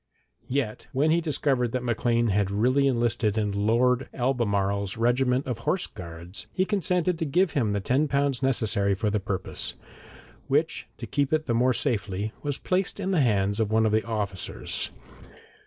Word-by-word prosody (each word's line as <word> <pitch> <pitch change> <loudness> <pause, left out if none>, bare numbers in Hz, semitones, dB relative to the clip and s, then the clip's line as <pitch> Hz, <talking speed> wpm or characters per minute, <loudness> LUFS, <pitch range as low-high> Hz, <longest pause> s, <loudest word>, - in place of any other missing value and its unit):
Yet 125 -5 -2
when 145 +4 +2
he 170 +1 +3
discovered 135 -6 0
that 125 -1 -1
Maclean 120 -1 +1
had 100 0 +1
really 125 +7 +2
enlisted 120 -4 +1
in 105 -2 0 0.2
Lord 125 +3 +2
Albemarle's 100 -6 0
regiment 125 +3 +2
of 125 -3 -3
horse 180 +10 0
guards, 85 0 -9
he 185 - +1
consented 180 -3 0
to - - 0
give 175 +4 +2
him 115 -7 0
the 100 - -1
ten 135 +9 +1
pounds 140 -2 0
necessary 105 -6 +2
for 105 +2 -1
the 105 - +1
purpose, 95 -1 -3 0.7
which, - - 0
to - - -6
keep 140 0 0
it 155 0 +1
the 120 - 0
more 125 +2 +3
safely, 105 -5 -1
was 145 -1 -1
placed 185 +2 -1
in 195 -1 -1
the 175 -5 +3
hands 100 -4 +1
of 110 -2 +1
one 110 0 +3
of 110 - +2
the 110 +1 +2
officers. 105 -5 -3
120 Hz, 170 wpm, -26 LUFS, 105-140 Hz, 0.7 s, he